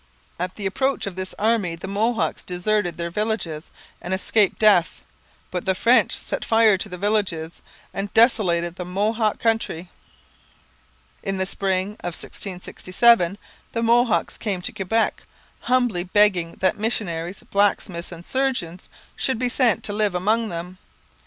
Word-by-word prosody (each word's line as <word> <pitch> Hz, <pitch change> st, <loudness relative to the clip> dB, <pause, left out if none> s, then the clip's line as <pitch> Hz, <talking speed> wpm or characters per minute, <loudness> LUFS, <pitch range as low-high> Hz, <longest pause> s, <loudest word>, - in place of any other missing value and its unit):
At 180 Hz, +1 st, -3 dB
the 205 Hz, -, -6 dB
approach 265 Hz, +8 st, 0 dB
of 195 Hz, -3 st, -5 dB
this 185 Hz, 0 st, -5 dB
army 210 Hz, -6 st, +1 dB
the 170 Hz, +3 st, -8 dB
Mohawks 220 Hz, +4 st, 0 dB
deserted 180 Hz, 0 st, -1 dB
their 170 Hz, 0 st, -4 dB
villages 190 Hz, -6 st, -3 dB, 0.3 s
and 185 Hz, +2 st, -1 dB
escaped 200 Hz, +1 st, +2 dB
death. 205 Hz, -7 st, +3 dB, 0.5 s
But 180 Hz, -1 st, -3 dB
the 190 Hz, -1 st, +2 dB
French 235 Hz, +6 st, +4 dB
set -, -, -3 dB
fire 225 Hz, -2 st, +4 dB
to 205 Hz, +3 st, -4 dB
the 180 Hz, -, -6 dB
villages 185 Hz, -5 st, -1 dB, 0.3 s
and 195 Hz, +1 st, -4 dB
desolated 180 Hz, -7 st, +3 dB
the 180 Hz, -, -4 dB
Mohawk 210 Hz, +4 st, 0 dB
country. 220 Hz, -6 st, -1 dB, 1.3 s
In 195 Hz, 0 st, -2 dB
the 190 Hz, -, 0 dB
spring 190 Hz, 0 st, -1 dB
of 175 Hz, -2 st, -5 dB
1667 190 Hz, +1 st, +1 dB, 0.4 s
the 230 Hz, -, -1 dB
Mohawks 235 Hz, 0 st, +2 dB
came 195 Hz, -5 st, -3 dB
to -, -, -2 dB
Quebec 215 Hz, +4 st, 0 dB, 0.4 s
humbly 245 Hz, -8 st, +1 dB
begging 185 Hz, -3 st, +2 dB
that 190 Hz, +2 st, +1 dB
missionaries, 185 Hz, -5 st, -2 dB
blacksmiths, 200 Hz, -4 st, 0 dB
and 170 Hz, 0 st, -9 dB
surgeons 250 Hz, -10 st, -1 dB, 0.3 s
should 260 Hz, -, 0 dB
be 250 Hz, +1 st, 0 dB
sent 240 Hz, -3 st, +2 dB
to 205 Hz, -, -2 dB
live 205 Hz, -3 st, 0 dB
among 215 Hz, +5 st, +1 dB
them. 180 Hz, +1 st, -7 dB
195 Hz, 145 wpm, -23 LUFS, 180-225 Hz, 1.3 s, French